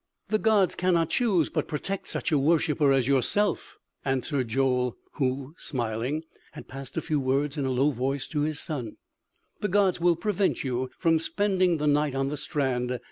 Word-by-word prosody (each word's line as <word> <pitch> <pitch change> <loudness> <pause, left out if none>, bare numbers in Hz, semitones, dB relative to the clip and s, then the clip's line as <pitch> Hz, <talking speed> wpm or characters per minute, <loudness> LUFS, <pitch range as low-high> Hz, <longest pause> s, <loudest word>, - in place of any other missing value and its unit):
"The 215 +1 +2
gods 210 -4 +3
cannot 175 -3 +1
choose 200 -10 +2
but - - -1
protect 185 +5 -3
such - - -2
a 150 - +4
worshipper 150 -1 +3
as 135 -3 +2
yourself," 150 - +1 0.3
answered 135 0 -1
Joel, 125 0 +1 0.2
who, 135 +1 -1
smiling, 125 +4 -2 0.3
had 150 - -10
passed 135 0 -8
a - - +1
few 150 -2 0
words 140 +2 0
in 140 -3 -1
a - - 0
low 135 +4 +2
voice 135 +2 -2
to 150 -3 -1
his 155 0 -1
son. 125 -9 -4 0.6
"The 210 - -1
gods 195 -2 +2
will 175 0 +4
prevent 200 +2 0
you 130 -1 -2
from 165 -2 +3
spending 185 -1 +1
the 150 - -2
night 145 -1 +2
on 135 0 0
the 150 - -4
strand.... 130 -3 -1
145 Hz, 180 wpm, -27 LUFS, 130-170 Hz, 0.6 s, a